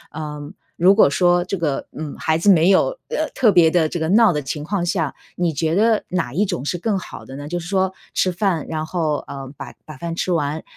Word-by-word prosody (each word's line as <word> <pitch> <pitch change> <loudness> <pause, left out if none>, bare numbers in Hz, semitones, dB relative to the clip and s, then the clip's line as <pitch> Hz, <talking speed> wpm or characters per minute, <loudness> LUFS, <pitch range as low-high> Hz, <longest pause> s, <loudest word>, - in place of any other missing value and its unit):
嗯， 150 -1 -6 0.2
如 185 +3 +5
果 215 - +6
说 175 +3 +3
这 190 +2 -3
个， 155 -5 -2
嗯， 155 -1 -6
孩 160 0 0
子 200 +5 +2
没 170 -1 +5
有， 350 - +3
呃， 485 - -1
特 230 -5 +4
别 175 -4 +5
地 160 -1 +2
这 175 - -4
个 160 - -1
闹 215 +1 +5
的 150 - -1
情 145 +2 -5
况 175 +2 -2
下， 165 -5 -1 0.2
你 175 -2 0
觉 160 +3 0
得 220 +2 +3
哪 175 -9 -2
一 195 +8 +2
种 175 -10 -3
是 175 - -1
更 205 +3 -1
好 185 - -9
的 135 - -10
呢？ 145 +1 -7
就 175 - -2
是 175 - -8
说 190 -1 0 0.2
吃 185 - +1
饭， 175 -4 -1
然 155 -1 -3
后， 160 -3 -1
呃， 135 -1 -7
把 - - -8
把 155 -3 -10
饭 165 +3 -5
吃 180 - -2
完， 155 -1 -1
170 Hz, 255 characters per minute, -20 LUFS, 155-190 Hz, 0.2 s, 果